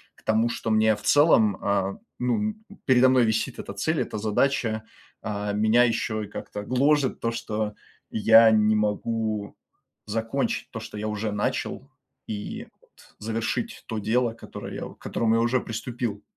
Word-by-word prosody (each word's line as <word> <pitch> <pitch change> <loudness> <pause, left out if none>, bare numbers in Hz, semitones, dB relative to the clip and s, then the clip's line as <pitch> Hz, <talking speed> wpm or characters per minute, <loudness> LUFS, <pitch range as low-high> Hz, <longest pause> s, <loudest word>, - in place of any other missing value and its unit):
к - - -24
тому, 110 +2 +2
что 115 - -3
мне 110 0 +4
в 105 - -13
целом, 115 - +5
а, 100 -1 0 0.2
ну, 210 - 0 0.3
передо 130 -1 +5
мной 130 -2 +4
висит 110 0 -1
эта 100 - -6
цель, 155 +11 0
эта - - -4
задача, 110 +1 0 0.4
а, 105 -1 -3
меня 110 +3 +4
ещё 110 -2 0
и - - -7
как-то 105 0 -7
гложет 135 +4 +2
то, 115 - -1
что 110 -2 -3 0.3
я 110 +1 +6
не 110 0 +4
могу 105 0 -1 0.5
закончить 115 +5 -2
то, 115 - -5
что 110 -1 -8
я 105 +1 -3
уже 105 0 -2
начал, 130 +5 -2 0.4
и 105 -1 -5
вот - - -23
завершить 115 - -3
то 110 -2 -3
дело, 115 +2 +1
которое 115 - -9
я - - -5
к - - -36
которому 115 -1 0
я 115 - +3
уже 120 +2 +2
приступил. 115 -2 -4
110 Hz, 160 wpm, -25 LUFS, 105-120 Hz, 0.5 s, я